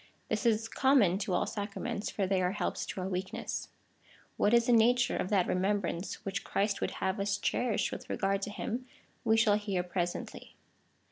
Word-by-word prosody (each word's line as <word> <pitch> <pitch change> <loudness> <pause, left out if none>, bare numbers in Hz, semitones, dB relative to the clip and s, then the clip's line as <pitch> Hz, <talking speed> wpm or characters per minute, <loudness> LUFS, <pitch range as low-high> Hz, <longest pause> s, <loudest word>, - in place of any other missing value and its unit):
This 240 - 0
is 225 0 +2
common 230 -9 +3
to 190 -2 -2
all 180 - +2
sacraments, 205 0 -4
for 200 - -1
they 190 0 +1
are 180 +1 +1
helps 210 - -2
to 190 - -4
our 185 - -2
weakness. 190 0 -4 0.7
What 205 - +2
is 235 0 +5
the 245 - +2
nature 240 +2 +4
of 185 - -2
that 195 -4 +3
remembrance 195 0 -1
which 195 +2 -2
Christ 200 +1 0
would - - 0 0.2
have 190 +2 0
us 200 0 0
cherish 230 +2 0
with - - -7
regard 195 0 0
to 205 - -3
him, 240 +4 -4 0.4
we 225 -1 +3
shall 220 -2 +5
hear 200 -4 -1
presently. 175 -1 -4
200 Hz, 185 wpm, -31 LUFS, 190-225 Hz, 0.7 s, is